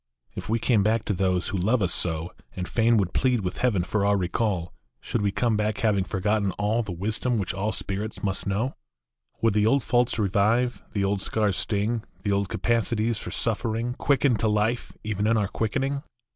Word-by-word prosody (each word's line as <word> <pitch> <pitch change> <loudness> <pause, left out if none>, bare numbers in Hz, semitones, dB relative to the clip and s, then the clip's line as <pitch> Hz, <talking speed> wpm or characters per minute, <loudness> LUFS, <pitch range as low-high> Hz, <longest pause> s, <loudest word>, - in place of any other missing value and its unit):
If - - -7
we 115 - +2
came 115 -1 +2
back 110 +2 +1
to 105 - 0
those 95 -1 0
who 100 - -2
love 110 +4 +2
us 90 - +1
so, 80 0 0 0.2
And 90 -1 -4
fain 115 0 +3
would 95 -4 0
plead 125 -3 +2
with 90 -1 -3
Heaven 110 -8 +2
for 100 +3 -1
our 100 0 +3
recall, 90 -1 -1 0.3
Should 115 - -2
we 100 -1 +1
come 110 +3 +1
back 105 0 0
having 100 -4 +1
forgotten 100 +1 0
all 105 +3 0
The 105 -5 -5
wisdom 110 +7 -1
which 95 -2 -2
all 100 +3 -1
spirits 105 +2 -4
needs - - -13
must 95 0 -2
know? 110 +7 0 0.7
Would 115 -2 +4
the 105 +1 +3
old 135 +2 +3
faults 120 -1 +2
revive, 110 +4 +1
the 100 -3 0
old 100 0 0
scars 105 -3 0
sting, 110 +2 -1 0.2
The 100 - 0
old 100 -1 0
capacities 115 -1 +1
for - - -6
suffering 115 +1 -1
Quicken 135 -2 +2
to 110 - +1
life 105 +3 0
even 105 -1 -1
in 115 0 +3
our 105 -2 +1
quickening? 135 +7 -1
105 Hz, 200 wpm, -26 LUFS, 100-115 Hz, 0.7 s, Would